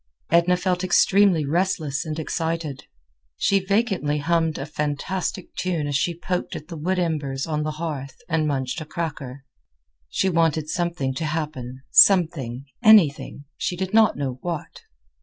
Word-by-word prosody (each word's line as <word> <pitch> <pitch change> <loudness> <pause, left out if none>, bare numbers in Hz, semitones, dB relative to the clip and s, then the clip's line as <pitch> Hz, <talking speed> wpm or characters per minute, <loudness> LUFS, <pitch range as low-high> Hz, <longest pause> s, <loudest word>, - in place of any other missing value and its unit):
Edna 170 +2 +4
felt 180 0 -1
extremely 185 -2 +4
restless 160 -2 -1
and 155 -1 -4
excited. 160 -3 -3 0.5
She 200 - +2
vacantly 195 -6 0
hummed 165 +1 0
a 135 - -4
fantastic 150 +6 -3
tune 175 -5 -1
as 145 -1 -2
she 165 +4 0
poked 180 +1 -3
at 150 - -8
the 170 - -6
wood 180 +5 -1
embers 145 -6 -1
on 150 -2 -2
the 155 0 -2
hearth 150 -4 -5
and 160 -2 0
munched 135 +2 -2
a - - -6
cracker. 145 -5 -5 0.7
She 190 - 0
wanted 165 -3 +1
something 170 -7 -1
to 160 +5 -3
happen—something, 145 - +2 0.2
anything; 175 - +4
she 180 - -2
did 190 +2 -4
not 220 -6 +4
know 130 -3 -3
what. 170 -3 -5
160 Hz, 145 wpm, -23 LUFS, 145-180 Hz, 0.7 s, Edna